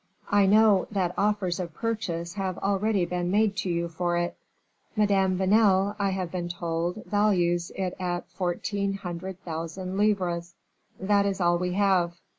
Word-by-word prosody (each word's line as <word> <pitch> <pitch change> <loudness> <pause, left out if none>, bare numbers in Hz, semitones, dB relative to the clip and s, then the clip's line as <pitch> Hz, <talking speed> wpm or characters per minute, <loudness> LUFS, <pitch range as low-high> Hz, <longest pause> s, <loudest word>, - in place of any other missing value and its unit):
I 200 -1 +5
know 210 -1 +5
that 185 -4 -1
offers 200 -4 0
of 170 -4 -5
purchase 185 -7 -3
have 190 -3 -3
already 200 -1 +1
been 175 0 -2
made 205 +1 +2
to 190 -2 -2
you 170 0 0
for 175 +1 -1
it." 175 0 -1 0.6
"Madame 195 -3 +2
Vanel, 195 0 +3
I 200 -1 +1
have 185 -3 -3
been 175 -2 -3
told, 170 +3 -3
values 175 -5 +1
it 185 -2 -2
at 175 -1 -3
fourteen 195 +2 -2
hundred 185 -1 -6
thousand 170 +3 -5
livres." 175 -5 0 0.4
"That 200 +1 +2
is 195 -1 -2
all 175 -1 +2
we 180 0 -1
have." 185 -3 +2
185 Hz, 155 wpm, -27 LUFS, 175-200 Hz, 0.6 s, I